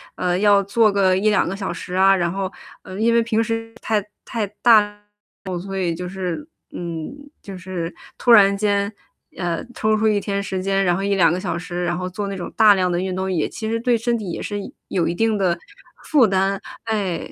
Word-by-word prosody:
呃， 180 0 0
要 205 0 +5
做 210 +2 +3
个 190 -2 +3
1，2 210 -1 +2
个 190 - -3
小 190 -3 -4
时 180 +2 -7
啊。 195 +1 +5
然 170 -2 0
后， 195 0 -3 0.3
嗯， 190 +3 -7
因 230 +1 +3
为 230 - +4
平 225 0 +1
时 225 0 -4
太 220 -2 +1 0.3
太 225 -4 -2 0.2
大 230 -3 +8 0.7
了， 180 -2 -3
所 195 +2 -6
以 175 -3 -1
就 180 +1 -5
是 190 - -4 0.2
嗯， 165 -2 -5 0.3
就 195 -2 -8
是 180 -2 -5 0.3
突 240 - +3
然 200 -3 +7
间 200 0 0 0.4
呃， 175 +2 -2
抽 215 0 +1
出 220 +1 +2
1 210 -1 +3
天 200 -1 -2
时 190 -1 -3
间， 195 0 +1
然 175 -1 +3
后 195 - -3
1，2 190 -5 +3
个 180 - -2
小 180 -3 -3
时， 175 0 -4
然 175 0 -1
后 185 0 -3
做 200 +2 -4
那 195 -1 -4
种 175 - -6
大 215 -2 +7
量 185 -2 +1
的 175 - 0
运 185 -1 -3
动， 190 0 -2
也 160 - 0
其 220 - -6
实 230 - 0
对 240 -1 +2
身 235 +1 0
体 195 -4 -5
也 - - -5
是 205 -1 -3 0.3
有 175 -3 0
一 170 - -1
定 225 +1 +1
的 175 -3 +1 0.5
负 270 -8 +4
担。 195 +1 0 0.2
哎！ 205 -6 -2
195 Hz, 225 characters per minute, -21 LUFS, 180-215 Hz, 0.7 s, 大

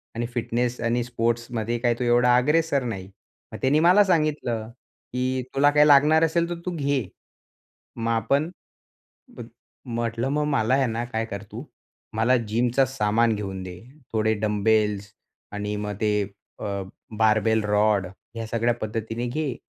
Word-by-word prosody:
आणि 120 - -2
फिटनेस 120 +1 -1
आणि 120 +1 0
स्पोर्ट्समध्ये 120 -1 -2
काय 120 -1 +2
तो 125 - -1
एवढा 120 +1 +4
अग्रेसर 150 +1 +2
नाही. 95 -6 -5 0.4
मग - - -6
त्याने 140 +4 +3
मला 180 +5 +6
सांगितलं, 150 - 0 0.4
की 130 0 -1
तुला 145 +1 +5
काही 150 +1 +5
लागणार 150 +3 +6
असेल 170 +1 +1
तर 175 - -2
तू 180 - -2
घे. 140 -4 0 0.9
मग 115 0 -2
आपण 135 +8 +1 1.4
म्हटलं, 115 +1 -2
मग 150 +1 0
मला 125 -4 +1
आहे 135 -2 +2
ना 115 +1 -2
काय 115 -2 -3
कर 100 -2 -7
तू, 115 +5 -7 0.5
मला 115 +4 +3
जिमचा 120 +4 +2
सामान 115 -3 +1
घेऊन 95 -2 -5
दे. 90 -1 -8 0.3
थोडे 110 0 +2
डंबेल्स 105 -1 +1 0.4
आणि 105 0 -3
मग 105 0 -3
ते 105 -1 +2 0.4
अ, 100 -2 -3 0.4
बार्बेल 110 0 +3
रॉड 105 -2 +2 0.3
ह्या 115 0 -4
सगळ्या 115 +1 +1
पद्धतीने 115 +2 -3
घे. 135 0 -2
115 Hz, 145 wpm, -24 LUFS, 110-135 Hz, 1.4 s, मला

